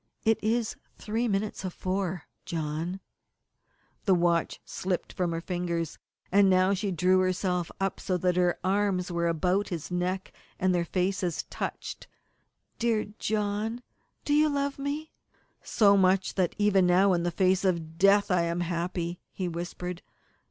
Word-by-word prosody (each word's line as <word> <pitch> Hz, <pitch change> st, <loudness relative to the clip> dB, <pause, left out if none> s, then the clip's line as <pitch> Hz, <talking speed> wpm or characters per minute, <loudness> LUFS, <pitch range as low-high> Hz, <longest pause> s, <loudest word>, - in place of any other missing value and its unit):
"It 220 Hz, -1 st, +2 dB
is 225 Hz, +1 st, 0 dB, 0.2 s
three 225 Hz, +3 st, -1 dB
minutes 205 Hz, -1 st, -1 dB
of 185 Hz, -2 st, -4 dB
four, 185 Hz, -3 st, -2 dB, 0.2 s
John." 165 Hz, +3 st, -3 dB, 1.0 s
The 190 Hz, -, +5 dB
watch 170 Hz, -1 st, +1 dB
slipped 180 Hz, -1 st, -3 dB
from 180 Hz, -2 st, -1 dB
her 165 Hz, 0 st, -2 dB
fingers, 170 Hz, -2 st, -3 dB, 0.3 s
and 200 Hz, 0 st, +5 dB
now 185 Hz, +1 st, +4 dB
she 200 Hz, +1 st, -1 dB
drew 185 Hz, +1 st, +3 dB
herself 185 Hz, -2 st, 0 dB
up 195 Hz, 0 st, -1 dB
so 185 Hz, -, -1 dB
that 180 Hz, 0 st, +1 dB
her 180 Hz, -1 st, +2 dB
arms 190 Hz, -2 st, +1 dB
were 170 Hz, 0 st, 0 dB
about 180 Hz, +5 st, +1 dB
his 170 Hz, -1 st, -5 dB
neck, 180 Hz, +2 st, -2 dB, 0.3 s
and 185 Hz, 0 st, +2 dB
their 175 Hz, -1 st, +1 dB
faces 180 Hz, -1 st, -1 dB
touched. -, -, -5 dB, 0.7 s
"Dear 225 Hz, -3 st, +1 dB
John, 215 Hz, +3 st, -1 dB, 0.4 s
you 300 Hz, +1 st, +4 dB
love 280 Hz, -1 st, -1 dB
me?" 290 Hz, +3 st, -3 dB, 0.5 s
"So 200 Hz, -2 st, +4 dB
much 190 Hz, 0 st, +3 dB
that 185 Hz, -3 st, 0 dB
even 200 Hz, -3 st, +4 dB
now, 185 Hz, +2 st, +5 dB
in 175 Hz, -, +1 dB
the 175 Hz, -, 0 dB
face 185 Hz, +2 st, +2 dB
of 165 Hz, -4 st, -1 dB
death, 200 Hz, +1 st, +5 dB
I 180 Hz, -1 st, +4 dB
am 170 Hz, +1 st, -1 dB
happy," 175 Hz, 0 st, -2 dB
he 185 Hz, -, -3 dB
whispered. 175 Hz, +1 st, -5 dB
185 Hz, 150 wpm, -28 LUFS, 175-200 Hz, 1.0 s, The